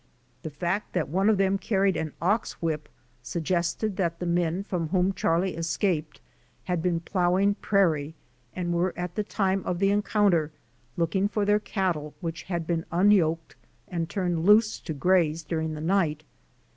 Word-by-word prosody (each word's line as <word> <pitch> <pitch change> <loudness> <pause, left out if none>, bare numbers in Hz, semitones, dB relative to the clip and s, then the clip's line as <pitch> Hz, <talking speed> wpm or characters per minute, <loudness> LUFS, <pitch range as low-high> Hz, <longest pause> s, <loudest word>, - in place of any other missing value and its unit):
The 160 - -5
fact 175 +7 -3
that 175 -6 -1
one 190 +6 +2
of 215 - +3
them 195 0 +2
carried 195 -2 +1
an 160 -2 -3
ox 205 +6 0
whip 155 -3 -3 0.3
suggested 170 - -1
that 170 -4 0
the 175 - -4
men 175 +1 0
from 180 -5 -2
whom 185 +2 +2
Charlie 180 0 0
escaped 165 -2 -1 0.4
had 180 -3 -1
been 170 -1 0
plowing 185 +3 +2
prairie 165 -8 +1 0.4
and 175 -1 -2
were 175 +1 0
at 180 -1 -4
the 210 - -1
time 195 -2 0
of 180 - -2
the 195 +2 +2
encounter 200 -6 +2 0.5
looking 190 +4 +1
for 205 0 -1
their 205 +1 +3
cattle 180 -8 -2
which 165 -2 -4
had 170 -3 -2
been 165 0 -1
unyoked 170 -3 +2 0.3
and 170 -2 -3
turned 175 -5 -1
loose 215 +3 +5
to 160 - -6
graze 165 0 +2
during 160 -1 -2
the 150 - -6
night. 160 -3 +1
175 Hz, 165 wpm, -26 LUFS, 165-195 Hz, 0.5 s, loose